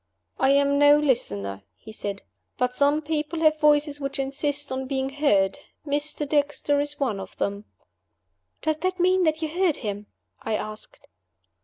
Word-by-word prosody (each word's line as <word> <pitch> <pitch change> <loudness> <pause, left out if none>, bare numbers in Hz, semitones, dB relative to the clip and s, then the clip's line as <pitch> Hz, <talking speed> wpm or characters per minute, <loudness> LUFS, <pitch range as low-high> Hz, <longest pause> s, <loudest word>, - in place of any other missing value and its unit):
"I 265 - +3
am 280 0 +3
no 290 0 +7
listener," 100 - 0 0.2
he 220 - -12
said. 200 -2 -5 0.3
"But 250 0 0
some 285 +3 +2
people 310 +1 -2
have 310 -1 +4
voices 295 -1 +3
which 275 0 -3
insist 280 +1 -1
on 260 0 -3
being 265 0 -1
heard. 275 -6 +1 0.3
Mr. 295 +1 -1
Dexter 290 0 +1
is 290 0 -2
one 240 -8 -1
of 190 -1 -10
them." 200 +1 -3 1.0
"Does 310 -1 +1
that 370 +3 -2
mean 370 +1 +3
that 315 0 0
you - - 0
heard 350 -1 +1
him?" 205 0 -4 0.3
I 220 - -2
asked. 215 0 -7
285 Hz, 160 wpm, -25 LUFS, 250-300 Hz, 1.0 s, no